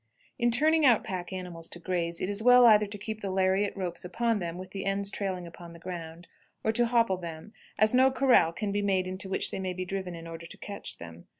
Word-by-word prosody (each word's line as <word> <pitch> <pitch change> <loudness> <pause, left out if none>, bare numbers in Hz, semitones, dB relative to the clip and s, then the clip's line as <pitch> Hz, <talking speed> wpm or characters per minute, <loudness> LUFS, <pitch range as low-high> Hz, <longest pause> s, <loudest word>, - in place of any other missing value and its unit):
In 240 -1 +3
turning 310 +6 +3
out 245 -6 +5
pack 185 -1 -5
animals 180 -3 -6
to - - -7
graze, 170 -1 -2
it - - -2
is 205 +1 -2
well 245 +1 +7
either 210 -2 +6
to 205 +1 -7
keep 215 +1 -6
the 195 - -3
lariat 190 +2 +1
ropes 180 -3 -4
upon 225 +5 0
them 170 -1 -4
with 185 0 -9
the 195 - -5
ends 195 0 -1
trailing 190 -3 -3
upon 170 0 -11
the 170 - -13
ground, 170 -1 -8 0.4
or 220 - +2
to 240 +1 +2
hopple 230 -5 +2
them, 170 +3 -8 0.2
as 215 +1 +4
no 260 +1 +6
corral 260 -10 +4
can 200 +4 -3
be 205 +1 0
made 190 -2 +1
into 185 +1 -6
which - - +2
they - - -4
may 185 -1 -3
be 185 0 -4
driven 190 -2 -4
in 165 0 -9
order 165 0 -8
to - - -12
catch 200 -1 -3
them. 85 0 -11
190 Hz, 240 wpm, -28 LUFS, 175-215 Hz, 0.4 s, well